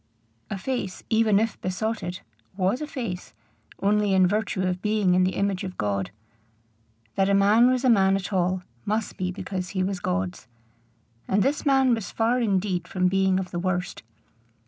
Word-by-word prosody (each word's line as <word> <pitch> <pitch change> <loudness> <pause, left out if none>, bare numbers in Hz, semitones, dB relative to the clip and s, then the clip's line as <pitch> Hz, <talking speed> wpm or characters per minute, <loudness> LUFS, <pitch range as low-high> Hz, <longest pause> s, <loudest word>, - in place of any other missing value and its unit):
A 200 - -3
face, 195 -3 -4
even 220 -2 +4
if 225 0 -2
besotted, 185 -1 -3 0.4
was 195 +7 +1
a 300 - -3
face, 230 - -6 0.5
only 205 0 +2
in 185 -1 +5
virtue 205 0 0
of 180 0 -1
being 210 -3 +2
in 185 0 +4
the 185 - -1
image 200 -1 -1
of 185 -1 -6
God. 100 -3 -1 1.0
That 195 0 +1
a 200 - +4
man 210 +5 +5
was 255 0 +1
a - - +5
man 195 -3 +4
at 195 +1 -4
all, 185 0 0 0.2
must 215 +1 -2
be 185 0 -2
because 185 -1 -5
he 185 -1 -1
was 190 0 -2
God's. 90 - -3 0.8
And 195 +1 +2
this 290 +2 0
man 265 -2 +4
was 225 -5 -3
far 235 +2 +1
indeed 190 -5 0
from 185 -1 +1
being 190 0 +2
of 185 -1 -5
the 175 - -3
worst. 180 0 -2
195 Hz, 175 wpm, -25 LUFS, 185-220 Hz, 1.0 s, in